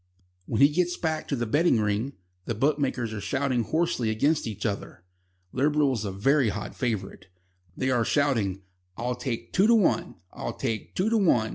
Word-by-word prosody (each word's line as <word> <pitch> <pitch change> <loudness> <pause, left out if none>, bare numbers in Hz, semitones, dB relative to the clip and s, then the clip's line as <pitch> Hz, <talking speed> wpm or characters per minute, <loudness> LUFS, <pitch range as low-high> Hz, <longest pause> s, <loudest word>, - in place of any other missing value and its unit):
When 110 - 0
he 140 - +8
gets 175 +3 0
back 160 -2 -2
to 140 - -1
the 120 -2 -1
betting 145 +2 +3
ring, 105 +6 -1 0.3
the 115 - -2
bookmakers 130 -3 0
are 105 - -5
shouting 125 +6 0
hoarsely 140 -3 0
against 140 +7 +1
each 105 -2 -5
other. 100 -4 -4 0.5
Liberal 145 +1 +2
is 110 -3 -3
a 100 - -2
very 130 +6 +2
hot 105 +1 -5
favourite. 115 -6 -3 0.5
They 130 0 0
are 120 -2 +2
shouting: 115 -9 +1 0.3
"I'll 125 +2 -1
take 120 -2 -5
two 195 +3 +4
to 235 - +6
one. 210 -5 +2 0.2
I'll - - -4
take 110 -1 -4
two 205 +5 +1
to 225 - +3
one. 120 - +3
125 Hz, 180 wpm, -27 LUFS, 110-150 Hz, 0.5 s, he